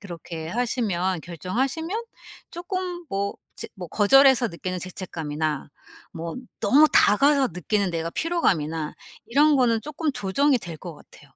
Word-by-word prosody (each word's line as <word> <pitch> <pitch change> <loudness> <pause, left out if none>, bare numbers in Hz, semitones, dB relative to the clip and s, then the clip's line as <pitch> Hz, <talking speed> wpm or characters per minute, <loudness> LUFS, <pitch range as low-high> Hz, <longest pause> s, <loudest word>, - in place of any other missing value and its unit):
그렇게 170 -4 -7
하시면 190 -5 -1
결정하시면 270 - -3 0.5
쪼끔 355 -1 -5
뭐 200 +1 -2 0.2
제 - - -6
뭐 180 -2 -7
거절해서 260 - +5
느끼는 180 0 -5
죄책감이나 155 -5 -4 0.4
뭐 165 0 -6 0.3
너무 305 +3 +5
다가가 275 +6 +5
느끼는 195 +1 -1
내가 165 0 -3
피로감이나 165 - -1 0.3
이런 295 +5 +4
거는 230 -3 +3
쪼끔 300 +1 -2
조정이 260 +7 +2
될 170 -6 -8
것 175 -3 -8
같아요. - - -18
205 Hz, 305 characters per minute, -24 LUFS, 170-280 Hz, 0.5 s, 거절해서